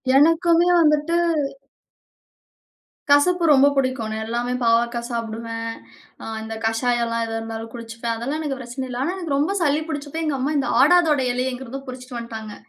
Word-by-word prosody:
எனக்குமே 330 +4 +4
வந்துட்டு 300 +1 +3 2.0
கசப்பு 350 +5 +4
ரொம்ப 280 -1 +6
புடிக்கும். 260 -3 0
ஆனா 220 - -3
எல்லாமே 240 +2 -2
பாவக்காய் 235 +1 +2
சாப்டுவேன். 230 0 -4 0.5
ஆ - - -9 0.2
இந்த 225 0 -6
கஷாயலாம் 230 0 0
எதுவா 225 0 -4
இருந்தாலும் 225 0 -6
குடிச்சுப்பேன். 230 0 -5
அதெல்லாம் 270 +7 -3
எனக்கு 290 -4 -3
பிரச்சன 250 +2 -5
இல்ல, 245 -1 -5
ஆனா 340 +6 -1
எனக்கு 335 -7 -2
ரொம்ப 295 +7 +1
சளி 295 -2 +2
பிடிச்சப்ப, 295 +1 -4
எங்க 300 -3 0
அம்மா 275 +4 0
இந்த 275 - 0
ஆடாதொட 305 -1 +5
இலைய 250 +1 -1
எங்கருந்தோ 260 +1 -7
பிடிச்சுட்டு 255 -1 -8
வந்துட்டாங்க. 220 -2 -7
255 Hz, 150 wpm, -22 LUFS, 230-295 Hz, 2.0 s, ரொம்ப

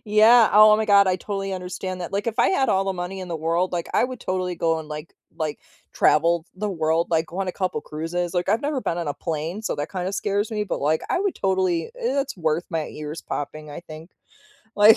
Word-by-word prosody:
Yeah, 220 +2 +6
oh 215 +1 +8
my 220 - 0
god, 200 -2 +6
I 185 - +2
totally 195 +1 -4
understand 185 0 -5
that. 175 - -6
Like, 200 +3 -1
if 230 +1 -2
I - - +5
had 270 -8 +2
all 195 0 +2
the 195 - 0
money 185 +1 -5
in 185 - -7
the 170 - -3
world, 165 +3 0
like, 170 -2 -2
I - - +4
would 250 -1 -5
totally 185 -1 -2
go 165 -1 +1
and, 155 - -8
like 150 +1 -7 0.2
like, 155 -2 -3 0.3
travel 165 +2 +3
the 210 +3 -3
world. 165 -1 +1
Like, 165 -1 +2
go 175 - -8
on 195 -1 -1
a - - -2
couple 185 -1 -2
cruises. 170 +3 -4
Like, 175 +1 0
I've 220 +3 +2
never 285 -2 -1
been 170 - -1
on 170 -3 -2
a 145 - -2
plane, 165 +5 -4
so - - -1
that 145 +1 -3
kind 185 -2 -4
of 195 - -2
scares 205 +2 -1
me, 210 -1 -1
but 205 - -3
like, 155 +3 +2
I - - +2
would 395 -2 0
totally 185 -3 0
it's 280 - -1
worth 160 0 0
my 160 -3 -1
ears 150 +1 -7
popping, 150 +1 -5
I 145 - -7
think. 160 0 -11 0.6
Like, 210 +2 +8
180 Hz, 245 wpm, -24 LUFS, 165-205 Hz, 0.6 s, oh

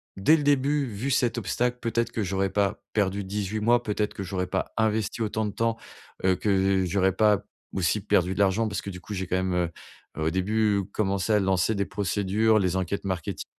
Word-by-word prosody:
dès 100 +12 +5
le 150 - -2
début, 145 0 +2
vu 115 +6 -3
cet 120 -2 +1
obstacle, 120 +3 -1
peut-être 115 0 -1
que 115 -2 -2
j'aurais 95 0 0
pas 100 +1 0
perdu 100 -1 0
18 105 +2 -3
mois, 120 +3 +3
peut-être 105 -1 -1
que 100 - -5
j'aurais 95 -1 -3
pas - - -2
investi 110 0 0
autant 110 0 -1
de 105 - -2
temps, 115 +2 0 0.5
heu, 95 0 +4
que 95 -2 +2
j'aurais 95 +1 +2
pas 105 -1 +3 0.3
aussi 95 +3 +1
perdu 95 -2 +2
de 95 - -7
l'argent 100 +3 +2
parce 100 - -3
que - - -7
du 90 -2 -8
coup, 105 - -7
j'ai 95 -2 -3
quand 90 - -1
même, 95 -1 -1 0.6
heu, 80 - -2
au 80 - +2
début, 100 +3 +1
commencé 100 0 0
à 105 - +4
lancer 95 +2 +1
des 100 0 0
procédures, 105 +3 +1
les 95 -2 0
enquêtes 95 +2 -2
marketing, 95 -4 -3
100 Hz, 210 wpm, -26 LUFS, 95-110 Hz, 0.6 s, dès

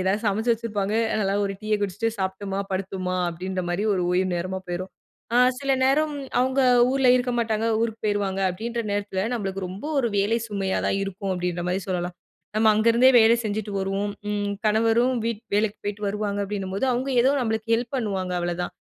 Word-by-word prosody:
எதாவது 195 +4 0
சமைச்சு 220 +4 +2
வச்சிருப்பாங்க. 210 -3 -2 0.3
நல்லா 195 -1 +1
ஒரு 195 - -4
டீய 215 0 +1
குடிச்சுட்டு 205 +3 -1
சாப்ட்டம்மா 195 +1 -2
படுத்தோம்மா 185 -1 -2
அப்பிடின்றமாரி 180 +1 -3
ஒரு 185 - 0
ஓய்வு 185 +1 +2
நேரமா 185 +2 -3
போயிரும். 175 +2 -4 0.4
அ - - +5 0.2
சில 275 -1 +1
நேரம் 300 +3 +2 0.3
அவுங்க 260 +2 +2 0.3
ஊர்ல 265 -1 +3
இருக்க 250 0 0
மாட்டாங்க. 225 -1 0
ஊருக்கு 225 -1 -2
போயிருவாங்க 200 -2 0
அப்பிடின்ற 230 +6 -3
நேரத்துல 200 -2 -2
நம்மளுக்கு 195 -4 -3
ரொம்ப 190 +6 -8
ஒரு 245 -3 +2
வேலை 210 +4 +2
சுமையா 195 -2 -1
தான் - - +1
இருக்கும். 195 0 -4
அப்பிடின்றமாரி 180 +1 -2
சொல்லலாம். 180 -1 -2 0.4
நம்ம 220 0 +4
அங்கருந்தே 230 +4 +5
வேலை 225 +1 +6
செஞ்சுட்டு 210 -1 -3
வருவோம். 195 +1 -1 0.2
ம் 205 -1 -1
கணவரும் 225 +4 +3
வீட் 230 -1 -2
வேலைக்கு 210 0 +1
போயிட்டு 205 +1 -4
வருவாங்க, 205 0 -2
அப்பிடின்னும்போது 195 +2 -2
அவுங்க 255 +3 -1
ஏதோ 260 - +4
நம்மளுக்கு 220 -2 -2
ஹெல்ப் 235 +1 -2
பண்ணுவாங்க, 195 -6 -2
அவ்வளதான் 175 0 -2
205 Hz, 165 wpm, -24 LUFS, 190-225 Hz, 0.4 s, வேலை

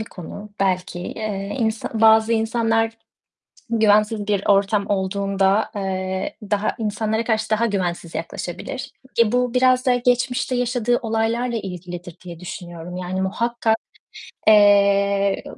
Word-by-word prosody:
bir 220 - -3
konu 205 +2 -10
belki. 185 -2 0
Eee, 205 +1 -4
insa 220 -2 -1
bazı 220 0 +5
insanlar 225 0 +1 0.7
güvensiz 215 -1 +2
bir 200 -2 0
ortam 200 0 +2
olduğunda, 195 +1 +1
eee, 190 -1 -3 0.2
daha 205 +1 0
insanlara 220 +1 -1
karşı 220 -1 -1
daha 220 +1 +2
güvensiz 180 -5 -2
yaklaşabilir. 175 +10 -5 0.3
E, 220 -2 +3
bu 250 0 +1
biraz 255 0 +3
da 250 -1 +4
geçmişte 245 +1 0
yaşadığı 245 -1 +1
olaylarla 230 +1 -1
ilgilidir 180 -3 -7
diye 170 -2 -8
düşünüyorum. 175 -1 -8
Yani, 185 +1 -3
muhakkak, 225 +3 0 0.7
eee, 200 -1 +4
210 Hz, 120 wpm, -21 LUFS, 195-225 Hz, 0.7 s, bazı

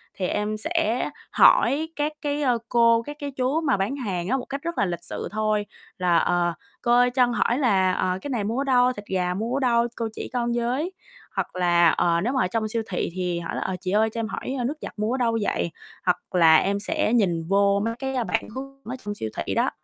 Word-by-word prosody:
thì 185 - -2
em 210 +2 -1
sẽ 320 -1 0 0.2
hỏi 310 +4 +5
các 300 +1 -1
cái, 290 0 -1
ơ, 250 -4 +2
cô, 230 -1 +4
các 295 +4 -8
cái 285 -1 -4
chú 265 +4 0
mà 280 -9 +2
bán 195 +8 -1
hàng 190 -10 -3
á, 265 - +1
một 250 - -5
cách 275 +1 -5
rất 340 +1 -4
là 200 - +2
lịch 175 -2 -4
sự - - -5
thôi 215 0 0 0.3
là 180 -2 +3
"Ờ, 175 0 +2 0.3
cô 240 - 0
ơi 245 +1 +5
cho 250 0 +3
con 240 - -2
hỏi 240 0 +1
là, 195 -8 +3
ờ, 185 0 0
cái 285 - -6
này 240 -6 -1
mua 220 +4 -2
ở - - 0
đâu, 255 -2 +3
thịt 205 -3 -9
gà 180 -2 -1
mua 225 +6 -3
ở - - 0
đâu, 235 -3 +2
cô 230 - -2
chỉ - - -6
con 240 -1 0
với." 250 +9 -1 0.4
Hoặc - - -3
là, 175 -2 +4
ờ, 170 +1 +2
nếu 240 +7 0
mà 260 - +2
ở - - +1
trong 220 +2 -1
siêu 225 +1 -2
thị 180 - -1
thì 180 -2 -2
hỏi 170 - -5
là: - - -3
"Ờ, 190 - -2
chị 185 0 -3
ơi 215 +2 +3
cho 230 - -6
em 225 - -1
hỏi, 255 +3 -4
ờ, - - -1
nước 280 +6 -2
giặt - - -6
mua 215 +2 0
ở - - 0
đâu 230 -3 +1
vậy?" 170 -4 -1 0.3
Hoặc 180 - +2 0.2
là 165 -3 +7
em 200 +5 +2
sẽ 210 +2 0
nhìn 180 -8 +2
vô 200 +1 +3
mấy 230 - -1
cái 265 -2 -1
bản - - -2
hướng 275 +1 -8
ở 245 - -4
trong 205 0 -3
siêu 110 - -4
thị - - -2
đó. - - +2
230 Hz, 255 wpm, -24 LUFS, 190-255 Hz, 0.4 s, là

